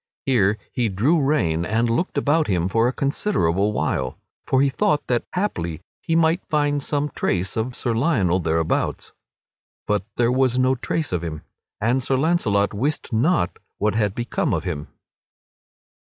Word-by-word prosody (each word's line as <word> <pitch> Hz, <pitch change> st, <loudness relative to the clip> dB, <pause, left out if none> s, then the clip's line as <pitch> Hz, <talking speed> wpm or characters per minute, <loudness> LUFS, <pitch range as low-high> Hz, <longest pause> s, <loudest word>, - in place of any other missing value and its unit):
Here 105 Hz, -6 st, +3 dB
he 120 Hz, -4 st, 0 dB
drew 130 Hz, -, +2 dB
rein 90 Hz, -, +1 dB
and 110 Hz, +5 st, +1 dB
looked 120 Hz, +11 st, -1 dB
about 155 Hz, +2 st, +2 dB
him 90 Hz, -3 st, +1 dB
for 115 Hz, +4 st, +2 dB
a -, -, +1 dB
considerable 105 Hz, -, 0 dB
while; 65 Hz, -10 st, -1 dB, 0.3 s
for 130 Hz, -, +3 dB
he -, -, +4 dB
thought 150 Hz, +2 st, +1 dB
that 120 Hz, -1 st, 0 dB
haply 85 Hz, -, -2 dB, 0.2 s
he 165 Hz, -, -1 dB
might 165 Hz, +2 st, +3 dB
find 145 Hz, -1 st, +1 dB
some 145 Hz, +1 st, -2 dB
trace 90 Hz, 0 st, -1 dB
of 120 Hz, +3 st, -2 dB
Sir 120 Hz, -, -1 dB
Lionel 115 Hz, -, +2 dB
thereabouts. 80 Hz, -1 st, -1 dB, 0.7 s
But 105 Hz, -2 st, 0 dB
there 120 Hz, 0 st, +3 dB
was 130 Hz, -1 st, +2 dB
no 130 Hz, +1 st, +3 dB
trace 145 Hz, +4 st, -2 dB
of 90 Hz, -2 st, -1 dB
him, 75 Hz, -2 st, -5 dB, 0.4 s
and 120 Hz, +5 st, +1 dB
Sir 130 Hz, +1 st, 0 dB
Launcelot 130 Hz, -10 st, +1 dB
wist 135 Hz, +5 st, -2 dB
not 125 Hz, -, +1 dB, 0.2 s
what 105 Hz, +1 st, +1 dB
had 105 Hz, -2 st, 0 dB
become 120 Hz, 0 st, -1 dB
of -, -, -3 dB
him. 75 Hz, +1 st, -4 dB
120 Hz, 160 wpm, -22 LUFS, 100-145 Hz, 0.7 s, he